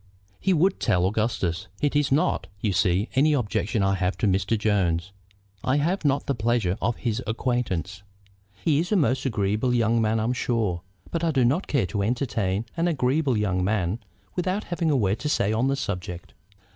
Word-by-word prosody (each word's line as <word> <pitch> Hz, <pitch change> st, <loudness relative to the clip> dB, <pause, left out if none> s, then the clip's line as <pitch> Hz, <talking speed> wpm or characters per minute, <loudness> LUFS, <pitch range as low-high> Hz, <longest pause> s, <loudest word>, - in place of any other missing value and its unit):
"He 195 Hz, -, +1 dB
would 185 Hz, +3 st, +2 dB
tell 90 Hz, 0 st, +2 dB
Augustus. 95 Hz, -4 st, -1 dB
It 145 Hz, 0 st, 0 dB
is 145 Hz, -2 st, +2 dB
not, 140 Hz, +3 st, +1 dB
you 105 Hz, -1 st, 0 dB
see, 90 Hz, +3 st, +2 dB
any 150 Hz, +4 st, +4 dB
objection 110 Hz, -, 0 dB
I 95 Hz, 0 st, +2 dB
have 95 Hz, 0 st, -1 dB
to -, -, 0 dB
Mr. 100 Hz, +3 st, +1 dB
Jones. 95 Hz, -5 st, 0 dB, 0.5 s
I 130 Hz, +2 st, +2 dB
have 170 Hz, +6 st, 0 dB
not 140 Hz, -1 st, +1 dB
the 140 Hz, -, 0 dB
pleasure 115 Hz, -5 st, 0 dB
of 120 Hz, +3 st, +1 dB
his 115 Hz, 0 st, -2 dB
acquaintance. 105 Hz, -, -2 dB, 0.6 s
He 150 Hz, -3 st, +3 dB
is 175 Hz, +4 st, -2 dB
a -, -, +4 dB
most 135 Hz, -, +2 dB
agreeable 110 Hz, +2 st, 0 dB
young 115 Hz, 0 st, +2 dB
man, 110 Hz, 0 st, +1 dB
I'm 115 Hz, +3 st, 0 dB
sure; 110 Hz, -8 st, -1 dB, 0.3 s
but 165 Hz, 0 st, -2 dB
I 165 Hz, -, +2 dB
do 135 Hz, -5 st, +2 dB
not 145 Hz, +11 st, +1 dB
care 135 Hz, -8 st, +1 dB
to 100 Hz, +3 st, -2 dB
entertain 110 Hz, -3 st, -1 dB
an 165 Hz, +1 st, +1 dB
agreeable 135 Hz, -3 st, +1 dB
young 95 Hz, -3 st, 0 dB
man 100 Hz, 0 st, 0 dB, 0.4 s
without 185 Hz, +3 st, -1 dB
having 170 Hz, -2 st, -1 dB
a 145 Hz, -, +3 dB
word 100 Hz, -3 st, +1 dB
to 150 Hz, -, -2 dB
say 105 Hz, -7 st, +1 dB
on 115 Hz, +4 st, +1 dB
the 135 Hz, -, +1 dB
subject. 90 Hz, -8 st, -5 dB
115 Hz, 190 wpm, -25 LUFS, 100-140 Hz, 0.6 s, any